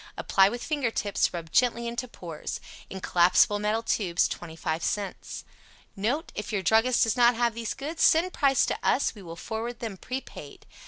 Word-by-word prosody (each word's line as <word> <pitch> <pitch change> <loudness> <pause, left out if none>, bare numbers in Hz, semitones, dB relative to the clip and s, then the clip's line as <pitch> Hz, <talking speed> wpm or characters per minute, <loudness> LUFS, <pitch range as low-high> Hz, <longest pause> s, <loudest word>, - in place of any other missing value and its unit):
Apply 195 0 +4
with 240 +3 -5
finger 290 -6 -1
tips, 205 -2 0
rub 165 -2 -7
gently 235 -1 +2
into 235 +2 -4
pores. 170 -9 -7 0.3
In 190 - -7
collapsible 180 +5 +4
metal 215 +2 0
tubes, 180 -6 +1
25 160 -1 -4
cents. 200 -3 -4 0.5
NOTE. 240 +11 -2
If 210 +1 -5
your 200 -3 -1
druggist 225 +6 +3
does 225 - +1
not 240 -1 +5
have 235 0 +1
these 230 -1 -4
goods, 310 +4 -5
send 345 +3 +4
price 275 -2 +3
to - - -2
us. 275 - +1
We 210 - -12
will 165 -3 -9
forward 230 +6 -5
them 220 -5 -5
prepaid. 255 +7 -8
225 Hz, 175 wpm, -27 LUFS, 190-245 Hz, 0.5 s, not